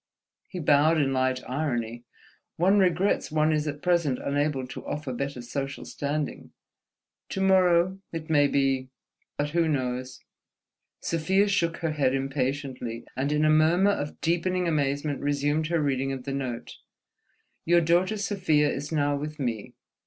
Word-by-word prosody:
He 185 - -7
bowed 155 0 +4
in 135 -2 +1
light 130 0 0
irony. 120 -4 -2 0.5
"One 190 +5 +3
regrets 185 -1 +2
one 155 0 +2
is 155 0 0
at 145 0 -5
present 170 -7 +2
unable 145 -1 -1
to 125 - -8
offer 150 -3 -4
better 135 0 -4
social 135 +3 -4
standing. 145 +1 -4 0.8
To - - -4
morrow, 185 -1 +3
it 165 -1 -5
may 145 -3 +4
be... 135 -2 +1 0.5
But 145 0 -1
who 165 0 +2
knows?" 130 -3 -2 0.8
Sofia 190 +5 +1
shook 170 -4 +1
her 160 - +1
head 135 -3 +1
impatiently, 135 -3 -3
and 140 +3 -1
in 150 +1 +2
a 155 - +5
murmur 165 +6 +4
of 150 -7 -4
deepening 175 +2 0
amazement 145 -2 0
resumed 145 +2 0
her 170 0 +1
reading 135 -2 0
of 135 -2 -5
the 135 - -4
note: 130 -4 -5 0.9
_"'Your 175 +1 +5
daughter 175 +6 +2
Sofia 180 -8 +1
is 140 +3 -5
now 145 -2 +1
with 150 +2 -5
me.. 115 -6 -3
150 Hz, 150 wpm, -27 LUFS, 135-165 Hz, 0.9 s, a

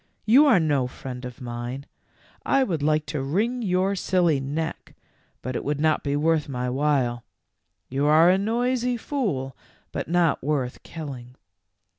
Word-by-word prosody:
"You 265 +8 +6
are 230 -9 +6
no 145 -6 +1
friend 125 0 -8
of 125 0 -9
mine. 120 +3 -5 0.6
I 275 - +3
would 170 - -2
like 155 +1 +1
to 150 -3 -3
wring 215 - 0
your 190 -1 +1
silly 175 -6 +2
neck, 150 +4 -4 0.5
but 130 0 -4
it - - -2
would 145 0 -2
not 155 0 +2
be 140 0 -1
worth 155 0 +1
my 125 -1 -2
while; 130 -4 0 0.6
you 140 +3 0
are 160 +4 +6
a 190 - +2
noisy 245 +3 0
fool, 175 - -2 0.4
but - - -4
not 170 -1 +2
worth 135 -4 -2
killing.' 130 -6 -8
150 Hz, 155 wpm, -25 LUFS, 135-185 Hz, 0.6 s, You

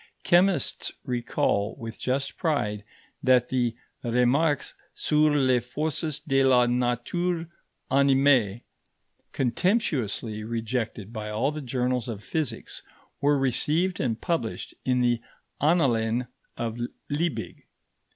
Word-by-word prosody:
Chemists 180 +2 +2
recall 120 -4 0
with 115 -1 -7
just 135 +2 -1
pride 105 - -1 0.4
that 125 -1 +4
the 120 -3 0 0.3
Remarques 125 +6 +2 0.2
sur 150 0 +3
les 130 -3 +4
forces 150 +4 -2
de 135 -3 +2
la 125 -2 +5
nature 125 +9 0 0.5
animée, 135 -6 +4 0.7
contemptuously 125 - 0
rejected 115 -1 -3
by 105 -2 -4
all 115 +7 0
the 155 0 -5
journals 125 -2 -1
of 105 -3 -6
physics, 160 -3 -3 0.4
were 145 0 +4
received 150 +7 +1
and 115 -4 -1
published 165 -11 -2
in 125 -1 +2
the 120 -1 +2 0.4
Annalen 125 -7 +2 0.3
of 115 0 -3 0.3
Liebig. 160 +3 -2
125 Hz, 105 wpm, -26 LUFS, 115-150 Hz, 0.7 s, la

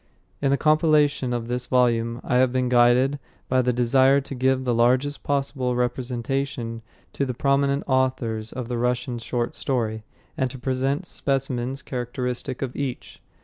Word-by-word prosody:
In 140 - +2
the 140 - +3
compilation 150 -4 +3
of 120 -1 -2
this 125 +1 -2
volume 115 -2 +1
I 125 - +1
have 130 0 +4
been 130 -1 0
guided 125 +3 +4 0.3
by 130 0 +3
the 125 0 +1
desire 130 +3 +4
to 140 0 -7
give 130 0 +1
the 125 -2 +1
largest 125 +5 +2
possible 135 -3 -1
representation 125 0 -2 0.3
to - - -1
the 130 -3 -2
prominent 140 +1 +1
authors 130 -4 0
of 125 -2 -5
the 120 -1 -2
Russian 125 0 -1
short 120 +1 -2
story, 110 -5 -2 0.3
and 130 - 0
to 130 - -8
present 135 +6 -1
specimens 135 -3 -2
characteristic 125 +1 -4
of 130 -2 -4
each. 135 -3 -5
130 Hz, 155 wpm, -24 LUFS, 120-135 Hz, 0.3 s, have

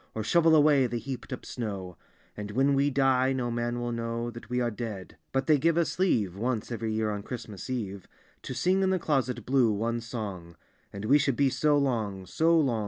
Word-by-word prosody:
Or 110 - -2
shovel 165 +6 +4
away 145 -4 +5
the 120 0 -3
hcap'd 130 +3 -7
up 130 - -6
snow; 100 -7 -5 0.4
And 105 0 -6
when 135 +6 +2
we 140 +1 +3
die 135 -1 +2
no 125 -2 -2
man 120 +1 -2
will 120 0 -2
know 115 0 -3
That 120 +1 -11
we 125 0 0
are 120 -1 0
dead; 105 -4 -6 0.2
but 135 0 0
they 150 -1 +4
give 165 +3 +2
us 170 +1 0
leave, 110 - +2
Once 115 +2 -2
every 115 -1 -2
year 110 0 0
on 105 -1 -3
Christmas 110 -2 -7
eve, 100 -7 -4 0.3
To - - -6
sing 185 +2 +2
in 190 - +2
the 190 - +2
Closet 135 -7 -1
Blue 130 -4 +3
one 115 +3 -1
song: 100 -8 -6 0.4
And 100 +1 -6
wc 140 +6 +5
should 135 -3 +1
be 140 +1 +3
so 145 +3 +2
long, 110 -9 -1
so 160 - +3
long. 130 -7 +1
120 Hz, 215 wpm, -28 LUFS, 110-140 Hz, 0.4 s, away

